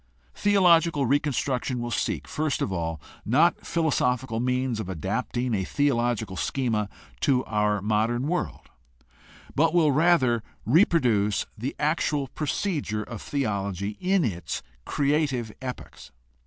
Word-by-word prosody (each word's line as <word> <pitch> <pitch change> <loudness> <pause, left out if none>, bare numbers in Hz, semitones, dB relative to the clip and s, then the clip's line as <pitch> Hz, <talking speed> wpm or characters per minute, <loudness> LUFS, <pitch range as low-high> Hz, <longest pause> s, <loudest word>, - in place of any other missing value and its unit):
Theological 170 -7 +4
reconstruction 135 -2 0
will 120 0 -4
seek, - - -2
first 155 -1 -1
of 95 - -2
all, 80 -2 -2 0.2
not 155 +10 +3
philo 165 -2 0
sophical 125 -3 0
means 125 -2 0
of 100 -4 -4
adapting 115 +7 -2
a 95 -3 0
theological 120 -5 0
schema 110 -1 -1 0.3
to 130 - +2
our 105 -2 0
modern 110 +4 +1
world, 180 +2 -3 0.8
but 165 +3 +2
will 160 -4 +5
rather 140 -6 +3 0.2
reproduce 120 - +3
the 125 +6 -4
actual 150 -2 0
procedure 145 - -2
of 115 -1 -8
theology 100 -6 -2
in 185 -2 +2
its 90 -6 -3 0.2
creative 140 -5 0
epochs. 125 -1 -7
125 Hz, 120 wpm, -26 LUFS, 105-150 Hz, 0.8 s, will